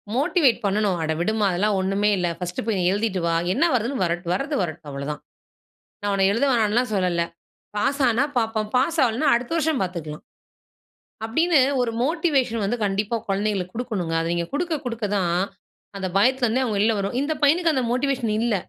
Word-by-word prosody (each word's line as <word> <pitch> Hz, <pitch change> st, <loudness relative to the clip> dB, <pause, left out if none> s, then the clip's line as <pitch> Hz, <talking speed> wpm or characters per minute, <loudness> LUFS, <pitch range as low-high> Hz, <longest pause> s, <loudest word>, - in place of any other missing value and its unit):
Motivate 280 Hz, -1 st, +3 dB
பண்ணனும் 200 Hz, -2 st, +1 dB
"அட 160 Hz, 0 st, -1 dB
விடுமா 215 Hz, +4 st, +1 dB
அதெல்லாம் 200 Hz, +4 st, +1 dB
ஒன்னுமே 195 Hz, +2 st, +1 dB
இல்லை, 175 Hz, -1 st, 0 dB
பர்ஸ்ட் 180 Hz, -1 st, -4 dB
போய் 210 Hz, -4 st, 0 dB
எழுதிட்டு 205 Hz, -1 st, -1 dB
வா, 170 Hz, -, +1 dB, 0.2 s
என்ன 285 Hz, -, +2 dB
வருதுன்னு 245 Hz, +3 st, 0 dB
வ -, -, +2 dB, 0.3 s
வரது 280 Hz, +10 st, -2 dB
வரட்டும் 160 Hz, -3 st, -5 dB
அவ்வளோதான், 140 Hz, +2 st, -5 dB, 0.8 s
நான் 205 Hz, 0 st, -1 dB
உன்ன 195 Hz, -1 st, +3 dB
எழுத 235 Hz, +6 st, +1 dB
வேணாம்னு 230 Hz, 0 st, +2 dB
சொல்லல, 180 Hz, -3 st, +1 dB, 0.5 s
பாஸ் 275 Hz, +7 st, 0 dB
ஆனா 240 Hz, +4 st, +2 dB
பார்ப்போம், 220 Hz, -2 st, -1 dB
பாஸ் 300 Hz, +6 st, +1 dB
ஆவலனா 250 Hz, +5 st, +1 dB
அடுத்த 240 Hz, +4 st, -2 dB
வருஷம் 320 Hz, -3 st, +1 dB
பார்த்துக்கலாம்." 165 Hz, -5 st, -5 dB, 1.0 s
அப்படினு 320 Hz, +8 st, +2 dB, 0.2 s
ஒரு 245 Hz, -2 st, +1 dB
மோட்டிவேஷன் 280 Hz, -8 st, +1 dB
வந்து 235 Hz, +5 st, -1 dB
கண்டிப்பா 205 Hz, +3 st, 0 dB
குழந்தைகளுக்கு 195 Hz, -2 st, -1 dB
கொடுக்கனுங்க, 205 Hz, -9 st, -2 dB
அதை 165 Hz, -, -2 dB
நீங்க 170 Hz, -1 st, -1 dB
கொடுக்க 335 Hz, +2 st, -1 dB
கொடுக்க 230 Hz, -2 st, -3 dB
தான் 175 Hz, -3 st, +1 dB, 0.6 s
அந்த 190 Hz, -1 st, -3 dB
பயத்தில 255 Hz, +4 st, +3 dB
இருந்தே 245 Hz, +4 st, +1 dB
அவங்க 220 Hz, -4 st, -1 dB
வெளியே 215 Hz, +2 st, +2 dB
வருவாங், 200 Hz, +5 st, -2 dB
இந்த 295 Hz, +2 st, -1 dB
பையனுக்கு 330 Hz, +3 st, +3 dB
அந்த 260 Hz, -2 st, 0 dB
மோட்டிவேஷன் 255 Hz, -4 st, 0 dB
இல்ல. 235 Hz, -2 st, +1 dB
220 Hz, 170 wpm, -23 LUFS, 190-260 Hz, 1.0 s, Motivate